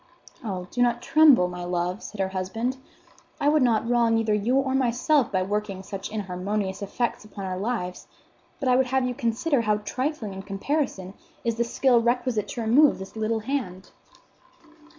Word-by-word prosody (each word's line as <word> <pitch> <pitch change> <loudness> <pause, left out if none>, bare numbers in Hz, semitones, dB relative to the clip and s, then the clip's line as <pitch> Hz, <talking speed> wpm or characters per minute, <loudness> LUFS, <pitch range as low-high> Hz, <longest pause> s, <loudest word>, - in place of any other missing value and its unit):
"Oh, 190 -5 -4
do 245 - -1
not 240 -1 +2
tremble, 305 - +6
my 180 0 -6
love," 175 +2 -2
said 215 - -9
her 190 -1 0
husband. 225 +7 -3 0.6
"I 285 - +1
would 300 0 +4
not 230 -3 +2
wrong 235 -1 +3
either 225 -1 +1
you 210 +5 +1
or 270 -1 +1
myself 265 +2 +2
by 185 -1 +1
working 200 -1 -3
such 195 0 -6
inharmonious 195 0 -3
effects 235 +4 -2
upon 205 -2 -8
our 185 -1 -3
lives; 195 -4 -3 0.5
but 275 - -2
I 250 - +5
would 260 0 +3
have 265 0 +1
you 250 - -1
consider 235 +5 0
how 215 -2 +1
trifling, 255 -5 -3
in 190 - -6
comparison, 195 -1 -2 0.3
is 230 - +1
the 235 - +2
skill 240 0 +3
requisite 240 -2 0
to 240 - -5
remove 265 +7 +5
this 190 +2 -9
little 220 0 -1
hand." 215 -7 -4
225 Hz, 175 wpm, -25 LUFS, 195-250 Hz, 0.6 s, tremble